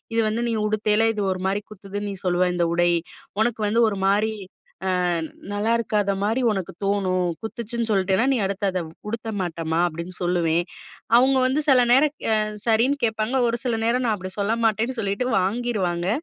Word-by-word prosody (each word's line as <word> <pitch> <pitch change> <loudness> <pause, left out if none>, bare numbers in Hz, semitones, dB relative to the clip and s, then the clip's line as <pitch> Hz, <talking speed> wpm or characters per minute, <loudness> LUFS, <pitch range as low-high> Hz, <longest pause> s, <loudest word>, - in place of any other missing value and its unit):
"இது 230 - +4
வந்து 225 +2 -1
நீ 230 - 0
உடுத்தேயில 215 +1 +2
இது 210 - -1
ஒரு 185 - -7
மாரி 200 +2 -1
குத்துதுன்னு 205 0 -6
நீ - - -5
சொல்லுவ, 180 0 +2
இந்த 170 -1 +1
உடை. 175 0 +3 0.5
உனக்கு 225 -1 0
வந்து 230 +3 +2
ஒரு 200 -2 -4
மாரி, 210 +3 +2 0.5
அ - - +1 0.6
நல்லாயிருக்காத 210 -1 +1
மாரி 225 +5 +1
ஒனக்கு 190 -5 -3
தோணும். 185 -3 +1 0.2
குத்துச்சுன்னு 230 +1 -4
சொல்லிட்டேன்னா, 195 +2 +2
நீ 255 - +1
அடுத்து 200 +1 -2
அதை 185 -1 -1 0.3
உடுத்த 225 0 -4
மாட்டம்மா." 165 -2 -2
அப்படீன்னு 170 +2 -7
சொல்லுவேன். 175 -1 +1 0.5
அவுங்க 265 +2 +4
வந்து 265 +4 +1
சில 260 -2 +6
நேரம் 285 +4 +5 0.2
அ 220 - +4 0.3
சரின்னு 235 +5 +3
கேட்பாங்க. 220 +2 0
ஒரு 230 - 0
சில 245 -3 0
நேரம் 240 +3 +1
நான் 220 -2 +2
அப்படி 185 -1 -7
சொல்ல 200 +2 +1
மாட்டேன்னு 225 +3 +1
சொல்லீட்டு 200 +4 -1
வாங்கிருவாங்க. 190 -4 -1
210 Hz, 170 wpm, -23 LUFS, 185-230 Hz, 0.6 s, சில